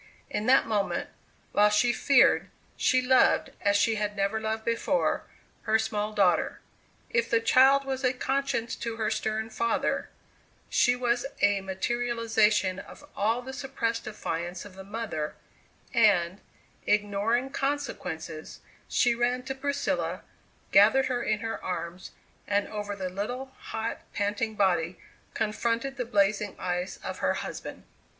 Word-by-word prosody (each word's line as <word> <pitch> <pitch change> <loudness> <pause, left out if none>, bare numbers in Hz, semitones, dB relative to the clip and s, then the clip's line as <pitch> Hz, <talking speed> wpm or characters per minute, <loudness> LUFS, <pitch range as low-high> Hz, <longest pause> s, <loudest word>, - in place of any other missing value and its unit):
In 210 - -2
that 265 +1 +6
moment, 210 -3 -1 0.4
while 210 0 +5
she 240 +4 +3
feared, 275 +4 +4 0.3
she 255 -1 +2
loved, 255 0 +4
as 200 -1 +3
she 220 +1 +2
had 210 0 -2
never 200 +2 0
loved 220 0 -2
before, 230 - 0 0.4
her 220 0 +4
small 215 -1 -2
daughter. 190 -5 +2 0.5
If 235 0 +1
the 230 - +3
child 265 +4 +5
was 265 0 -3
a 255 - +4
conscience 270 -2 -1
to 230 -1 -4
her 220 -1 -1
stern 220 +1 -2
father, 235 +1 0 0.6
she 245 0 +4
was 245 +1 0 0.2
a 205 -1 +4
materialization 215 -1 +1
of 290 - -12
all 225 +4 +1
the 265 +1 -7
suppressed 230 -4 -2
defiance 175 -3 -4
of 205 - -11
the 190 0 -10
mother, 200 -7 -4 0.6
and, 175 +3 +3 0.5
ignoring 210 +5 +1
consequences, 165 - -4 0.3
she 240 - +3
ran 245 +1 0
to 270 - -4
Priscilla, 280 +1 -2 0.5
gathered 270 0 +6
her 245 - -1
in 215 -2 0
her 225 0 -4
arms, 180 0 -4 0.4
and 205 0 +1
over 205 -1 -4
the 190 -2 -4
little, 245 +8 -4
hot, 225 +1 -4 0.2
panting 210 +2 -1
body, 180 -4 +1 0.4
confronted 230 +5 -1
the 250 - -2
blazing 205 -2 +1
eyes 180 +1 -3
of - - -5
her - - +1
husband. - - -6
220 Hz, 140 wpm, -28 LUFS, 200-245 Hz, 0.6 s, that